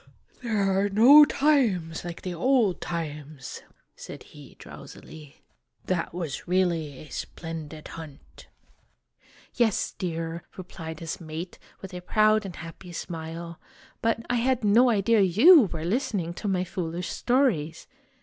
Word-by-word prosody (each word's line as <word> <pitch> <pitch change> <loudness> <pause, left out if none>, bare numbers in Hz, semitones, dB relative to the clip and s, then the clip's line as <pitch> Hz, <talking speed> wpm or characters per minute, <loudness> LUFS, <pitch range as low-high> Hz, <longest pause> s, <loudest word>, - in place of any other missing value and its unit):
"There 230 -3 -2
are 195 0 +1
no 255 +9 +8
times 230 - +1
like 175 -1 -7
the 185 - -4
old 220 +1 +2
times!' 150 -5 -6 0.3
said - - -10
he, - - -15
drowsily. 155 -2 -13 0.4
"That 180 -2 -1
was 165 -5 -5
really 170 -6 0
a 150 - -12
splendid 160 -2 -7
hunt!" 155 -4 -12 1.1
"Yes, 225 -4 +1
dear," 165 -1 -4 0.2
replied 165 -3 -8
his 165 +1 -5
mate, 160 +2 -7 0.2
with 190 - -8
a 180 - -6
proud 215 +3 +3
and 180 - -9
happy 165 +2 -10
smile; 170 +1 -7 0.4
"but 230 0 0
I 245 - 0
had 250 0 +1
no 230 +5 +5
idea 220 0 +3
you 230 - +7
were 160 -1 -4
listening 195 - -1
to 205 - -6
my 185 -2 +1
foolish 180 -1 -4
stories. 215 - 0
180 Hz, 130 wpm, -26 LUFS, 165-215 Hz, 1.1 s, no